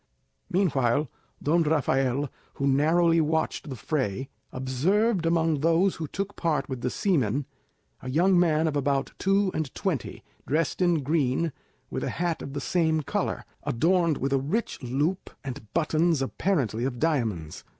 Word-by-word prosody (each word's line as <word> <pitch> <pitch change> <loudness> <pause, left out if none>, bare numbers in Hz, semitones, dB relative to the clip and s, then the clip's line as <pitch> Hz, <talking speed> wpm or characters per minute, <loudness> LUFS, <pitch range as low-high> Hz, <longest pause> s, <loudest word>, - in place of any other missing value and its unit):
Meanwhile, 145 - +1 0.3
Don 165 +4 +3
Rafael, 140 -3 +1 0.3
who 140 - -2
narrowly 165 +4 +4
watched 160 -1 -1
the 130 - -4
fray, 130 -1 -2 0.2
observed 165 - +1
among 165 -2 +2
those 165 +5 +3
who 160 - -4
took 200 +5 -4
part 150 -5 0
with 130 -3 -5
the 125 - 0
seamen 140 - +1 0.6
a 130 - -6
young 175 +6 +4
man 160 -2 +3
of 155 - -1
about 140 -1 0
two 195 0 +2
and 155 -5 -2
twenty, 175 - -3 0.2
dressed 160 +5 0
in 175 -5 +3
green, 150 +1 +1 0.4
with - - -3
a - - -1
hat 170 -1 -2
of 135 - -7
the 145 - -2
same 160 +2 +1
colour, 140 - -2 0.2
adorned 165 +3 +2
with 135 +1 -1
a 135 - +3
rich 160 - -2
loop 145 +9 -1
and 130 -5 -7
buttons 160 -2 +2
apparently 130 - 0
of 130 -1 -2
diamonds. 115 - -1
155 Hz, 150 wpm, -27 LUFS, 135-170 Hz, 0.6 s, narrowly